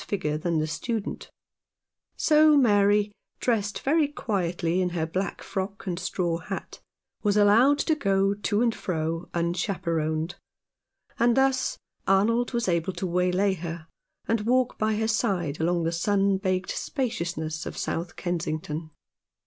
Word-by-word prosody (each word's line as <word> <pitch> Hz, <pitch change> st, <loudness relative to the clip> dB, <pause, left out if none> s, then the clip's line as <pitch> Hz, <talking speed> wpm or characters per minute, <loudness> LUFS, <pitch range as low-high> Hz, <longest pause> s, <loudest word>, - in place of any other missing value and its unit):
figure 150 Hz, -7 st, -1 dB
than 165 Hz, +2 st, -1 dB
the 155 Hz, -, +1 dB
student; 215 Hz, +7 st, -4 dB, 0.9 s
so 305 Hz, -1 st, +5 dB
Mary, 205 Hz, -4 st, +4 dB, 0.3 s
dressed 210 Hz, -4 st, 0 dB
very 300 Hz, +2 st, +3 dB
quietly 180 Hz, -, -1 dB
in 180 Hz, -, +1 dB
her 160 Hz, -, +1 dB
black 185 Hz, +4 st, -3 dB
frock 200 Hz, +2 st, -4 dB
and 180 Hz, -2 st, -2 dB
straw 175 Hz, -3 st, -1 dB
hat, 195 Hz, +3 st, -6 dB, 0.4 s
was 205 Hz, -1 st, +2 dB
allowed 225 Hz, +8 st, +5 dB
to 315 Hz, -, +1 dB
go 195 Hz, -8 st, +2 dB
to 205 Hz, +2 st, 0 dB
and 235 Hz, -2 st, +2 dB
fro 165 Hz, -2 st, -3 dB
unchaperoned, 170 Hz, -2 st, -1 dB, 0.9 s
and 235 Hz, +1 st, +3 dB
thus 265 Hz, -1 st, +2 dB, 0.3 s
Arnold 230 Hz, +5 st, +3 dB
was 235 Hz, -3 st, -1 dB
able 170 Hz, +1 st, 0 dB
to 190 Hz, -, -4 dB
waylay 180 Hz, +2 st, +2 dB
her 170 Hz, -2 st, -6 dB, 0.4 s
and 225 Hz, -1 st, +1 dB
walk 250 Hz, +3 st, +2 dB
by 215 Hz, 0 st, +1 dB
her 220 Hz, +1 st, 0 dB
side 190 Hz, -, 0 dB
along 170 Hz, +1 st, +1 dB
the 165 Hz, -, 0 dB
sun 195 Hz, +3 st, +2 dB
baked 185 Hz, -1 st, -1 dB
spaciousness 170 Hz, -, -3 dB
of -, -, -7 dB
South 170 Hz, +1 st, -3 dB
Kensington. 155 Hz, -2 st, -3 dB
195 Hz, 140 wpm, -26 LUFS, 170-220 Hz, 0.9 s, so